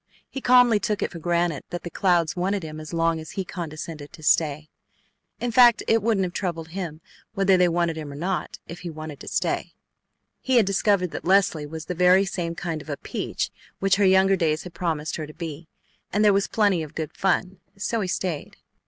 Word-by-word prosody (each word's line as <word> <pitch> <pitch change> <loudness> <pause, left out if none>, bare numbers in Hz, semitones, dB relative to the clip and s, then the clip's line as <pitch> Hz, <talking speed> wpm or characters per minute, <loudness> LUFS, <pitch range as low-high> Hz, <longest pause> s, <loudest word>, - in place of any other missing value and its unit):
He 270 - -7
calmly 245 -4 +5
took 210 0 -1
it - - -2
for 170 - -8
granted 170 -2 0
that 175 - -5
the 175 - -6
Clouds 175 -4 +2
wanted 190 +1 -1
him 155 -1 -7
as 155 0 -8
long 165 -1 +1
as 160 - -9
he 190 - -3
condescended 155 -4 -7
to 155 - -13
stay. 150 -1 +2 0.7
In 245 - -2
fact, 240 -1 +6
it 225 0 +3
wouldn't 215 -3 +2
have 180 -1 -3
troubled 170 -4 -3
him 170 -3 -5 0.3
whether 195 -1 +4
they 180 -1 +4
wanted 170 -1 0
him 150 -2 -6
or - - -8
not 180 +5 -3
if 170 +1 -8
he 175 - -6
wanted 155 -2 -8
to - - -11
stay. - - -2 0.6
He 260 - 0
had 230 -4 +6
discovered 195 -2 +1
that - - -6
Leslie 180 -5 +3
was 160 +1 -7
the 180 - -3
very 180 +2 +5
same 170 -3 -3
kind 165 -3 -4
of 155 - -13
a 145 - -3
"peach" - - -3 0.3
which 195 -1 +2
her 205 - +2
younger 190 +1 +5
days 160 -4 0
had 180 - -10
promised 160 -3 -2
her 155 -2 -5
to 155 - -12
be, 160 -1 -7 0.4
and 210 +1 +2
there 205 - +6
was 195 0 +2
plenty 205 -6 +2
of 155 -2 -8
good 155 -2 -4
fun, 190 -1 0 0.2
so 220 +3 -1
he 190 - -1
stayed. 180 -4 -3
175 Hz, 215 wpm, -24 LUFS, 160-195 Hz, 0.7 s, fact